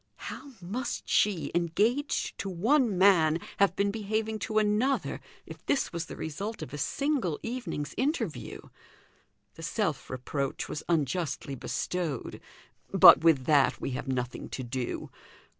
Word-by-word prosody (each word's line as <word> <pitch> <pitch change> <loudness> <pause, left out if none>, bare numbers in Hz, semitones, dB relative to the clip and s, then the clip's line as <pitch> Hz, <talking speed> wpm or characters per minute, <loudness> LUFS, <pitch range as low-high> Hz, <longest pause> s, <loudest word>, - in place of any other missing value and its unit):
How 280 - -10
must 235 +8 -4
she, 200 -5 +2
engaged 210 - 0
to 195 - -3
one 220 - +2
man, 170 -4 +5 0.2
have 195 -3 +3
been 200 0 +1
behaving 220 +1 -2
to 215 +2 -2
another, 215 +6 +1 0.2
if - - -11
this 275 - +1
was 170 0 -3
the - - -7
result 195 +5 -5
of 155 - -9
a - - -4
single 275 - 0
evening's 230 - -4
interview? 255 - -2 0.9
The - - -12
self 165 - -2
reproach 135 +2 -3
was 150 - -4
unjustly 150 -2 -1
bestowed; 155 +1 -3 0.5
but 140 - +9
with 155 -6 +4
that 145 -2 +4
we - - -3
have 135 +2 -4
nothing 125 -1 -3
to 130 - -5
do. 125 0 -4
180 Hz, 140 wpm, -29 LUFS, 145-220 Hz, 0.9 s, but